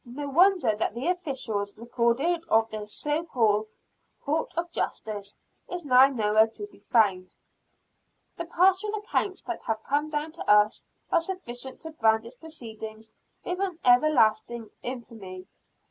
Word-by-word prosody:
No 270 Hz, +4 st, -6 dB
wonder 350 Hz, -, +4 dB
that 215 Hz, +1 st, -2 dB
the 260 Hz, +8 st, -1 dB
official 270 Hz, -, -2 dB
record 235 Hz, +1 st, 0 dB, 0.3 s
of 225 Hz, 0 st, +3 dB
this 210 Hz, -1 st, -4 dB
co 300 Hz, +2 st, 0 dB
called 220 Hz, -8 st, +1 dB, 0.6 s
court 310 Hz, +3 st, -1 dB
of 340 Hz, 0 st, -2 dB
justice 205 Hz, -8 st, -4 dB, 0.3 s
is 355 Hz, -3 st, -5 dB
now 255 Hz, 0 st, +7 dB
nowhere 220 Hz, -4 st, +3 dB
to 320 Hz, -, -8 dB
be 410 Hz, -, -19 dB
found. 195 Hz, -6 st, +1 dB, 1.0 s
The 340 Hz, -, -5 dB
partial 375 Hz, +5 st, +2 dB
accounts 410 Hz, -2 st, -2 dB
that 355 Hz, -, -5 dB
have 220 Hz, -1 st, -2 dB
come 295 Hz, +2 st, 0 dB
down 305 Hz, +1 st, -3 dB
to 335 Hz, -, -7 dB
us 210 Hz, +1 st, +4 dB, 0.3 s
are -, -, +4 dB
sufficient 265 Hz, -8 st, -6 dB
to 320 Hz, -, -6 dB
brand 225 Hz, -6 st, +2 dB
its 235 Hz, -, -9 dB
proceeding 220 Hz, -8 st, -9 dB, 0.4 s
with 360 Hz, -1 st, -2 dB
everlasting 240 Hz, -4 st, +3 dB
infamy. 225 Hz, -7 st, -7 dB
245 Hz, 140 wpm, -27 LUFS, 220-320 Hz, 1.0 s, now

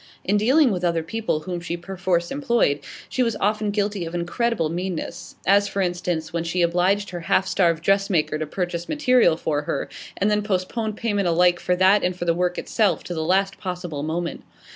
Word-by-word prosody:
In 200 Hz, -, +1 dB
dealings 255 Hz, +6 st, +4 dB
with 180 Hz, -2 st, -2 dB
other 170 Hz, -2 st, +1 dB
people 215 Hz, -3 st, -2 dB
whom 175 Hz, +2 st, -4 dB
she 170 Hz, 0 st, -4 dB
perforce 175 Hz, -1 st, -1 dB
employed, 240 Hz, -, +1 dB, 0.3 s
she 255 Hz, -, -2 dB
was 230 Hz, -2 st, +1 dB
often 210 Hz, +1 st, +1 dB
guilty 205 Hz, -2 st, -1 dB
of 165 Hz, +1 st, -5 dB
incredible 175 Hz, +2 st, 0 dB
meanness; 175 Hz, +1 st, -5 dB
as, 200 Hz, +1 st, +4 dB
for 200 Hz, -, -4 dB
instance, 175 Hz, -3 st, -2 dB
when 170 Hz, -1 st, -1 dB
she 175 Hz, +1 st, 0 dB
obliged 185 Hz, +4 st, +1 dB
her 175 Hz, -, -5 dB
half 175 Hz, +3 st, +1 dB
starved 165 Hz, -3 st, +1 dB
dressmaker 195 Hz, -5 st, +1 dB
to 155 Hz, -, -3 dB
purchase 175 Hz, +1 st, -3 dB
material 255 Hz, -, +3 dB
for 150 Hz, -3 st, -1 dB
her, 150 Hz, -, -3 dB, 0.3 s
and 205 Hz, +2 st, +1 dB
then 210 Hz, 0 st, +2 dB
postponed 210 Hz, +2 st, -2 dB
payment 205 Hz, -5 st, 0 dB
alike 175 Hz, +1 st, +3 dB
for 180 Hz, -, 0 dB
that 190 Hz, +3 st, +4 dB
and 180 Hz, 0 st, 0 dB
for 175 Hz, -, -3 dB
the 170 Hz, -, +3 dB
work 180 Hz, +1 st, -1 dB
itself 215 Hz, -4 st, +1 dB
to 175 Hz, -, -5 dB
the 160 Hz, -, -2 dB
last 195 Hz, +3 st, +1 dB
possible 180 Hz, -6 st, -4 dB
moment. 165 Hz, +3 st, -3 dB
180 Hz, 195 wpm, -23 LUFS, 170-205 Hz, 0.3 s, dealings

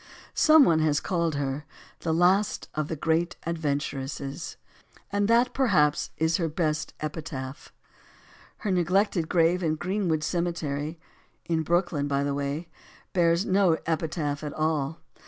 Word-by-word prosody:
Some 310 Hz, -2 st, +7 dB
one 160 Hz, -2 st, +4 dB
has 155 Hz, -2 st, +2 dB
called 170 Hz, -4 st, -1 dB
her 140 Hz, 0 st, -2 dB, 0.4 s
"the 165 Hz, -, -2 dB
last 180 Hz, +5 st, +2 dB
of 155 Hz, -1 st, -2 dB
the 160 Hz, -, -3 dB
great 165 Hz, +3 st, 0 dB
adventuresses." 145 Hz, -2 st, -3 dB, 0.5 s
And 205 Hz, 0 st, +1 dB
that 235 Hz, +2 st, +5 dB
is -, -, -18 dB
perhaps 150 Hz, -, +2 dB, 0.3 s
her 165 Hz, -, +1 dB
best 155 Hz, -1 st, -1 dB
epitaph. 150 Hz, -3 st, -6 dB, 0.9 s
Her 210 Hz, -, -2 dB
neglected 180 Hz, -1 st, +1 dB
grave 175 Hz, +1 st, +3 dB
in 160 Hz, -3 st, +1 dB
Greenwood 175 Hz, -2 st, -1 dB
Cemetery, 160 Hz, -2 st, -2 dB, 0.5 s
in 165 Hz, -1 st, 0 dB
Brooklyn, 170 Hz, -3 st, 0 dB
by 140 Hz, 0 st, 0 dB
the 140 Hz, 0 st, -1 dB
way 145 Hz, +4 st, -3 dB, 0.5 s
bears 170 Hz, +1 st, +3 dB
no 185 Hz, -4 st, +3 dB
epitaph 155 Hz, -3 st, -2 dB
at 150 Hz, -1 st, -4 dB
all. 155 Hz, -1 st, -1 dB
160 Hz, 135 wpm, -27 LUFS, 150-175 Hz, 0.9 s, Some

